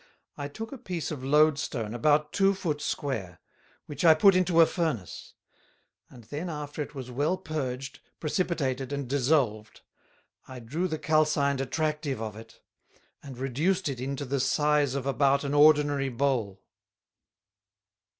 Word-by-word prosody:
I 145 - -5
took 220 +10 -8
a 275 - -8
piece 175 -6 -4
of 140 -4 -6
Load 150 +2 +4
stone 115 -6 -4
about 150 +5 +2
two 195 0 +3
Foot 155 -6 -3
square, 100 - -3 0.5
which 145 +1 -6
I 160 -2 +7
put 195 +4 +6
into 180 -2 +2
a 165 - +9
Furnace; 160 - -4 0.7
and 120 - -14
then 150 +10 -5
after 150 -1 -5
it 145 0 -6
was 130 -2 -7
well 150 +8 0
purged, 135 -6 -5 0.2
precipitated 145 -6 -1
and 140 -2 -3
dissolved, 125 -5 0 0.7
I 130 - -9
drew 145 +10 -3
the 160 -3 -3
calcined 150 -3 +1
Attractive 150 -1 -2
of 110 -2 -5
it, 115 +1 -13 0.6
and 135 -3 -10
reduced 155 +9 0
it 130 -3 -5
into 140 +2 -3
the 135 +1 -1
size 145 +1 +2
of 135 -2 -3
about 140 0 +2
an 140 0 -2
ordinary 145 -2 +4
Bowl. 120 -7 -1
145 Hz, 150 wpm, -28 LUFS, 130-155 Hz, 0.7 s, a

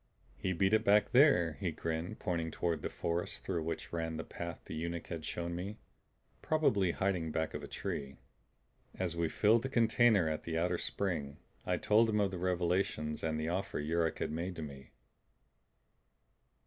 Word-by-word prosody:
"He 95 +10 -2
beat 95 +3 +2
it 110 0 +4
back 105 0 +4
there." 90 - +5
He 90 - 0
grinned, 80 +5 -3
pointing 85 -4 -1
toward 85 0 -1
the - - -2
forest 85 +1 -3
through 90 -4 -1
which 80 +1 -4
ran 80 -1 -2
the 80 - -3
path 85 -2 -6
the - - -7
eunuch 85 +1 -3
had 80 -2 -4
shown 85 +2 -3
me. 95 +5 -4 0.6
"Probably 110 - +2
hiding 90 -3 0
back 80 0 -1
of - - -4
a - - -7
tree." 70 -1 -4 0.8
As 90 -3 -2
we 85 -1 0
filled 110 +6 +4
the 135 - -3
container 115 - +4
at 80 -1 -1
the 80 -1 -2
outer 90 +1 +1
spring, 80 -8 -2 0.3
I - - +2
told 110 +2 +4
him 105 -1 +2
of 100 -2 +2
the 90 - -4
revelations 90 -3 0
and 80 -1 0
the 80 +1 -1
offer 95 +1 -2
Yuruk 80 +2 0
had - - -2
made 85 +3 -3
to 80 - -5
me. 70 -2 -9
85 Hz, 180 wpm, -34 LUFS, 80-100 Hz, 0.8 s, there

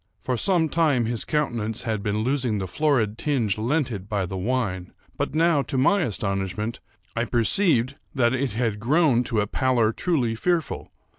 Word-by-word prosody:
For 130 - -1
some 170 - +3
time 150 -7 +2
his 115 -1 -1
countenance 120 -7 -1
had 110 -4 -2
been 105 +1 -1
losing 125 -4 0
the 95 - -2
florid 115 - 0
tinge 120 -9 0
lent 130 +4 0
it 100 -2 -6
by 100 -3 0
the 95 +2 -6
wine; 95 -3 -2 0.2
but - - -3
now, 165 -2 +3
to 135 - -3
my 190 +10 +3
astonishment, 100 - -2 0.4
I 115 - +1
perceived 130 - +2 0.2
that 120 -2 +3
it 130 -3 -1
had 110 -2 -1
grown 130 +1 +3
to 110 -3 0
a - - 0
pallor 120 -1 +1
truly 130 -10 0
fearful. 165 +7 -1
120 Hz, 170 wpm, -24 LUFS, 105-145 Hz, 0.4 s, some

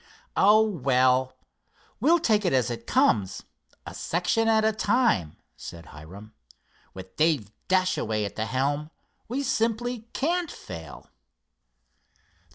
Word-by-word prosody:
"Oh, 215 +2 +5
well, 130 -6 +1 0.6
we'll 320 +9 +4
take 220 -10 +1
it 180 - +1
as 125 -2 +1
it 120 - -7
comes, 95 -3 +1 0.4
a - - -8
section 180 +7 0
at 220 -1 +3
a 220 - +4
time," 215 - +1 0.2
said 85 -2 -10
Hiram. 95 +10 -12 0.6
"With 95 0 -11
Dave 150 -10 +1 0.2
Dashaway 185 - +1
at 100 - -7
the 110 0 -2
helm, 145 +4 -1 0.4
we 260 +5 -2
simply 235 -1 -1
can't 340 +3 0
fail." 80 -2 -10
150 Hz, 120 wpm, -26 LUFS, -, 0.6 s, Oh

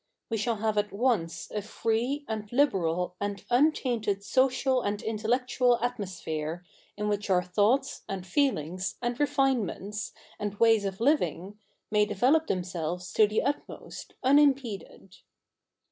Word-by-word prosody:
We 225 - +1
shall 230 +2 0
have 215 0 0
at 210 0 -2
once 200 -7 -1
a 210 - -2
free, 235 +7 -1
and 215 -2 -4
liberal, 180 - +1
and 200 -1 -3
untainted 240 -7 +2
social 260 +2 +2
and 205 -1 -2
intellectual 240 +3 +1
atmosphere, 180 -8 -4 0.3
in 210 0 -2
which 205 0 -1
our 180 -1 +3
thoughts, 215 +9 +1
and 190 -2 -4
feelings, 185 - 0
and 240 0 -2
refinements, 255 - 0 0.3
and 205 -1 -3
ways 225 -3 +5
of 195 +1 -4
living, 210 - 0 0.3
may 210 -1 +3
develop 255 +11 +2
themselves 180 -1 -3
to 215 - +5
the 210 +1 0
utmost, 285 +2 -5
unimpeded. 260 - +1
215 Hz, 130 wpm, -28 LUFS, 195-250 Hz, 0.3 s, ways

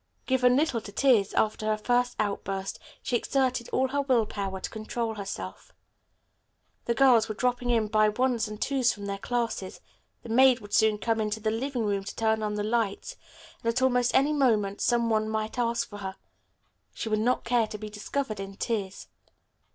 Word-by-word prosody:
Given 250 -1 +3
little 280 -6 +1
to 205 - -9
tears, 225 -3 +3
after 215 0 +1
her 215 0 +1
first 245 +3 +1
outburst 195 -2 -2 0.2
she 245 - -1
exerted 255 0 0
all 260 0 +1
her 285 +2 0
will 255 -5 +2
power 195 -2 -4
to - - -5
control 225 +1 -3
herself. 95 - -7 1.1
The 235 - 0
girls 240 -4 +5
were 215 - -3
dropping 245 +1 0
in 230 -2 +3
by 215 0 +3
ones 235 0 0
and 210 0 -8
twos 260 -2 +2
from 205 -1 -7
their 200 0 -4
classes, 230 -5 -3 0.4
the 235 - -10
maid 255 +2 +5
would 205 -2 -12
soon 220 -1 +4
come 225 +1 0
into 215 0 -2
the 215 0 -1
living 245 +1 -2
room 200 -1 -1
to 195 - -7
turn 220 -1 +1
on 210 -1 -2
the 210 - -2
lights, 220 -2 -1 0.5
and 230 - +2
at 255 +3 -1
almost 245 -1 +2
any 285 +3 +4
moment 215 -8 +1
some 235 -1 +2
one 215 -1 +1
might 220 +2 -3
ask 235 -1 0
for 205 - -9
her. 190 -1 -5 0.8
She - - -4
would 215 -1 +1
not 245 +4 +1
care 235 -1 +2
to 210 - -7
be 210 0 -8
discovered 215 +1 -3
in 195 0 -6
tears. 200 -3 -3
225 Hz, 190 wpm, -27 LUFS, 210-245 Hz, 1.1 s, girls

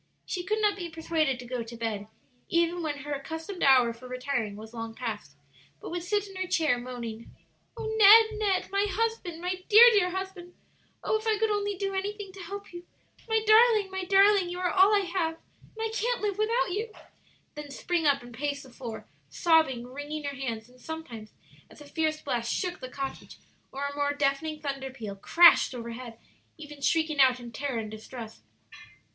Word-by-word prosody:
She 360 - -4
could 425 +4 -1
not 415 -1 +2
be 350 -3 -5
persuaded 320 -4 -1
to 245 - -10
go 245 0 -4
to 230 +1 -8
bed, 215 -3 -3 0.4
even 340 +1 +1
when 290 -3 -4
her 295 - -3
accustomed 320 +6 -6
hour 255 -4 +5
for 245 +2 -12
retiring 250 -4 -3
was 220 +2 -11
long 225 -1 -6
past, 210 - -6 0.4
but - - -8
would 350 0 -3
sit 410 +3 -1
in 390 - -13
her 375 0 -2
chair, 315 -8 +1
moaning, 235 -2 -7 0.5
"O 460 - -5
Ned! 440 0 +6
Ned! 390 -4 0
my 400 +1 +1
husband, 445 -6 -2
my 365 +1 -3
dear, 440 +2 +10
dear 405 -5 +3
husband! 375 -1 -6 0.5
Oh, 435 - +1
if 440 - -8
I 435 -1 +2
could 440 0 +1
only 410 -1 -1
do 390 +1 -3
anything 400 +1 -4
to 390 - -12
help 400 +1 -8
you! 350 0 -10 0.4
My 445 -1 +2
darling, 435 -2 +5
my 380 0 -3
darling! 390 0 +4
you 355 - -5
are 360 -1 0
all 385 +2 +5
I 405 - +3
have, 345 -3 -1 0.4
and 450 0 -1
I - - -7
can't 475 +2 0
live 415 -1 -2
without 450 -1 +1
you!" 435 +4 -3 0.6
then 295 -1 -8
spring 325 +3 -1
up 275 -3 +2
and 240 0 -12
pace 285 +3 -3
the 260 - -15
floor, 235 -3 -8 0.2
sobbing, 315 -8 +2
wringing 290 +4 -6
her 285 -1 -4
hands, 230 -5 -4
and 250 0 -21
sometimes, 245 -10 -8 0.4
as - - -16
a 295 - -12
fierce 310 +1 -1
blast 235 -4 -2
shook 360 -1 -2
the 255 - -7
cottage 270 +1 -6 0.3
or 275 +1 -4
a 285 0 -4
more 285 0 0
deafening 290 +2 -1
thunder 275 -2 -4
peal 225 -6 -7
crashed 335 - +6
over 235 -1 -6
head, 235 -1 -8 0.4
even 295 -2 -11
shrieking 315 +1 +1
out 260 -2 +5
in 240 -1 -9
terror 265 +1 -3
and 215 -1 -4
distress. 220 +1 -9
320 Hz, 200 wpm, -28 LUFS, 255-390 Hz, 0.6 s, dear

